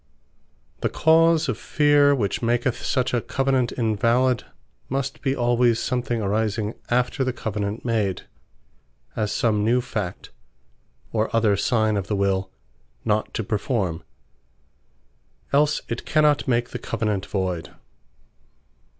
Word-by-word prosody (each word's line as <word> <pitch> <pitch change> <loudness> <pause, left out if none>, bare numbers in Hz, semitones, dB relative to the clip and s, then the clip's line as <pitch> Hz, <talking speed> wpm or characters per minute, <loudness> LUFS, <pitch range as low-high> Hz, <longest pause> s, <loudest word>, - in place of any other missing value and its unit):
The - - 0
cause 160 0 +4
of 125 -5 -2
Feare, 145 -1 +4
which 105 -7 -1
maketh 120 +1 0
such 130 -2 0
a 120 - +2
Covenant 135 -2 0
invalid, 115 +2 +1 0.4
must 135 +1 -3
be 135 0 0
alwayes 120 -1 +2
something 125 -1 -1
arising 105 +1 -1 0.2
after 125 +3 +1
the 130 - 0
Covenant 105 -2 -4
made; 110 -5 0 0.9
as 105 -2 -1
some 105 -3 +1
new 120 +3 +3
fact, 105 -7 -5 0.8
or 110 0 +1
other 110 -3 +3
signe 110 0 +1
of 100 -1 -3
the 105 - -1
Will 95 -1 0 0.6
not 105 0 0
to 115 - -1
performe; 100 - -1 1.5
else 150 +2 +3
it 115 - -4
cannot 150 -2 +2
make 120 -1 +1
the - - -5
Covenant 105 -4 -2
Voyd. 90 -4 -2
115 Hz, 125 wpm, -23 LUFS, 105-130 Hz, 1.5 s, cause